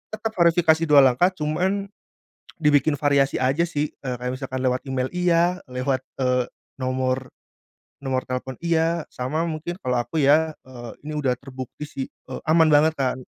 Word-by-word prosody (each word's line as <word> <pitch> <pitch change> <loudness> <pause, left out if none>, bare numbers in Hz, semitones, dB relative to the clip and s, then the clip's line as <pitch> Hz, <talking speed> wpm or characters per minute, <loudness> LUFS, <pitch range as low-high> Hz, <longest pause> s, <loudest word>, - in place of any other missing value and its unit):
tetep 220 +1 -3
verifikasi 170 -3 +3
2, 145 -2 +7
langkah 130 +7 +4
cuman 185 +4 -1 0.6
dibikin 150 -2 +3
variasi 140 -1 +2
aja 135 +7 +1
sih, 150 -3 -2
eee, 130 -3 -4
kayak 125 +1 -4
misalkan 130 0 -4
lewat 125 0 +1
email 130 -1 -2
iya, 180 0 +2
lewat, 130 +1 -1 0.2
eee, 125 -1 +1 0.3
nomor 130 0 -1 0.7
nomor 130 -2 -2
telepon 130 +1 -3
iya, 165 -1 0
sama 130 +6 -3
mungkin 160 +2 -4
kalau 125 -1 0
aku 155 +6 -1
ya, 155 +3 +4 0.2
eee, 120 -2 -8
ini 150 +1 -5
udah 135 -4 +1
terbukti 130 +2 -9
sih, 140 -3 -4 0.2
eee, 130 - -5
aman 160 0 +5
banget 155 +2 +5
kan, 130 -4 -1
145 Hz, 160 wpm, -23 LUFS, 130-160 Hz, 0.7 s, 2